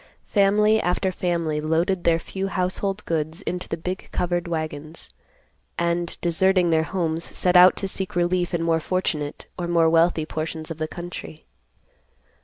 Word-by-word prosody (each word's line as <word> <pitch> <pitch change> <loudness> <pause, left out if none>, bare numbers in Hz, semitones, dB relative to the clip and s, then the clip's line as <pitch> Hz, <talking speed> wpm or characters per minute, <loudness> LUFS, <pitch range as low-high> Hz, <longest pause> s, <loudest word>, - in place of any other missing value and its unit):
Family 210 +2 +3
after 185 +2 0
family 170 -4 -1
loaded 170 +4 0
their 165 -1 +4
few 190 +3 -4
household 195 +2 -1
goods 160 +3 -2
into 180 0 -4
the 165 - -2
big 180 +3 -5
covered 175 -1 -1
wagons, 155 -1 -4 0.7
and, 170 0 -1
deserting 180 +1 +3
their 160 -1 +4
homes, 165 -1 -2
set 180 0 +2
out 180 +1 +8
to 195 - -3
seek 190 -1 -4
relief 175 0 +1
in 170 -2 -1
more 165 -1 +2
fortunate 155 -4 -2
or 175 - -2
more 165 -1 +3
wealthy 165 -1 +3
portions 160 +1 -4
of 165 - -6
the 155 - -1
country. 165 - -8
170 Hz, 155 wpm, -24 LUFS, 160-185 Hz, 0.7 s, out